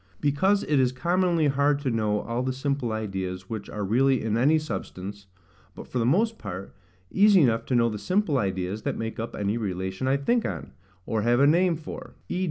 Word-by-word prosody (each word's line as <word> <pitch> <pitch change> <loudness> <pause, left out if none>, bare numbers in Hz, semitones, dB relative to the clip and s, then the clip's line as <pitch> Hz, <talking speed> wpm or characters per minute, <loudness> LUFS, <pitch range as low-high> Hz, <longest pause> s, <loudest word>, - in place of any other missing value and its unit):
Because 190 +8 +2
it 145 -2 +2
is 125 -1 +3
commonly 170 +4 +1
hard 140 +1 +2
to 135 -3 -1
know 105 -2 0
all 115 +2 -3
the 130 0 -1
simple 135 -2 -2
ideas 95 -3 -4
which 105 -3 -5
are 105 - -4
really 130 +5 +3
in 110 -1 0
any 140 +7 +4
substance, 100 -7 -6 0.5
but - - -9
for 125 - -3
the 115 - +1
most 220 - +2
part 95 +2 -7 0.4
easy 200 -2 +6
enough 115 -5 +2
to 130 - +1
know 120 -1 +4
the 105 -2 -3
simple 180 - +1
ideas 95 0 -2
that - - -2
make 115 0 -4
up 115 - -4
any 105 +3 -1
relation 95 +2 -3
I 135 +1 +3
think 230 - +1
on, - - -5 0.3
or 110 -1 -1
have 120 +3 +2
a 140 - +6
name 170 +3 +4
for: 160 0 -9
v. 180 - -2
125 Hz, 205 wpm, -26 LUFS, 105-150 Hz, 0.5 s, easy